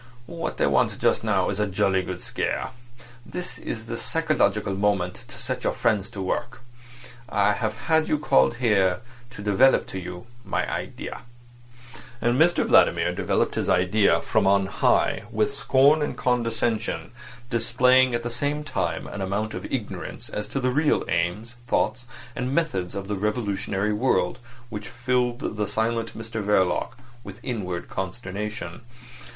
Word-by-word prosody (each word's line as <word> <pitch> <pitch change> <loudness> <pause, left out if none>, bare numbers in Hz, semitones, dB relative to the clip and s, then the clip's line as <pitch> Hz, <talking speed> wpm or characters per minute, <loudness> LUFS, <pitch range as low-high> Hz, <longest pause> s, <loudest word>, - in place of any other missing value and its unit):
What 165 +3 -5
they - - +2
want - - +2
just - - +2
now - - +1
is 100 - -4
a 105 - +1
jolly 95 -1 +2
good 90 0 -6
scare. - - -2 0.5
This 180 +6 -6
is 110 -1 -5
the 115 0 -4
psychological 115 - +1
moment 100 0 0
to - - -12
set 125 +1 -4
your - - +1
friends 105 -4 +1
to 95 - -5
work. 120 +7 -3 0.7
I 105 0 +3
have 110 0 -2
had 160 -1 +3
you 150 - +2
called 145 -5 +3
here 105 -6 +2 0.3
to 120 -4 -9
develop 105 +6 +4
to 95 - -4
you 90 +2 -7 0.2
my - - -1
idea." - - -5 1.0
And 120 +4 +2
Mr 175 +1 +4
Vladimir - - +4
developed - - 0
his - - -1
idea 95 +4 +3
from 95 - +2
on 100 0 +4
high, 95 - +1
with - - 0
scorn 140 +4 +4
and 150 - -2
condescension, 115 -3 -1 0.4
displaying 125 +2 +4
at 120 - -2
the 120 - -3
same 145 +5 0
time 150 - -2
an 100 - -6
amount 100 +3 -2
of - - -6
ignorance - - -5
as 105 0 -5
to 135 - -2
the 130 -1 +1
real 150 +3 +2
aims, 90 +8 -1
thoughts, 120 +2 0 0.3
and 125 +2 -2
methods 130 - -1
of 100 0 -4
the 105 -1 -2
revolutionary 105 -1 -1
world 120 +1 +1 0.3
which 105 -2 -6
filled 120 -1 -1
the 105 -1 0
silent 115 0 -1
Mr 110 -1 -4
Verloc 95 -3 +2 0.3
with - - -10
inward 95 -9 -3
consternation. 105 +4 -5
110 Hz, 155 wpm, -25 LUFS, 100-125 Hz, 1.0 s, develop